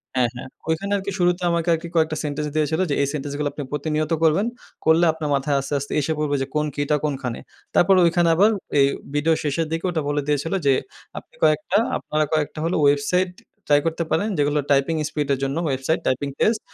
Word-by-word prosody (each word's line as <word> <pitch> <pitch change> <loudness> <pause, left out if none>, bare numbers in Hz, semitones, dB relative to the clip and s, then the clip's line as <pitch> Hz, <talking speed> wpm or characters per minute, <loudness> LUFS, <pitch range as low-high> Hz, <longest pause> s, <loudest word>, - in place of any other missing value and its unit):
হ্যা, 125 - +3
হ্যা। 125 - -7 0.3
ওইখানে 170 +5 -1
আরকি 200 0 -4
শুরুতে 175 0 +2
আমাকে 170 0 -1
আরকি 165 +1 -3
কয়েকটা 155 -1 +2
সেনটেন্স 150 0 -2
দিয়েছিলো 155 +3 +1
যে - - +1
এই 140 - +1
সেন্টেন্সগুলো 145 0 -3
আপনি 145 - -5
প্রতিনিয়ত 150 +2 -2
করবেন, 165 +7 +3 0.4
করলে 160 +2 +5
আপনার 155 -2 -4
মাথায় 140 +1 0
আস্তে, 140 +2 -5
আস্তে 140 - -7
এসে 150 +2 -1
পড়বে 150 -1 0 0.2
কোন 150 0 +2
কি'টা 145 +1 +1
কোনখানে। 135 -5 -3 0.4
তারপর 190 +2 +5
ঐখানে 170 0 +3
আবার 200 +6 +5 0.3
এ - - +7 0.3
ভিডিও 150 +3 +2
শেষের 150 +2 0
দিকে 165 +2 -2
ওটা 160 -3 -1
বলে 145 0 0
দিয়েছিল 150 +4 0
যে 135 - +5 0.4
আপনি - - -10
কয়েকটা, 155 +5 +3 0.2
আপনারা 155 0 -1
কয়েকটা 155 0 -1
হলো 170 - 0
ওয়েবসাইট 145 +6 +2 0.4
ট্রাই 145 0 +5
করতে 165 +1 -1
পারেন 200 +7 +1
যেগুলো 145 +1 +2
টাইপিং 140 +4 +3
স্পিডের 140 -3 -1
জন্য 135 +3 -1
ওয়েবসাইট, 135 +4 0
টাইপিং 130 +2 0
টেস্ট 215 0 +2
150 Hz, 190 wpm, -22 LUFS, 145-165 Hz, 0.4 s, এ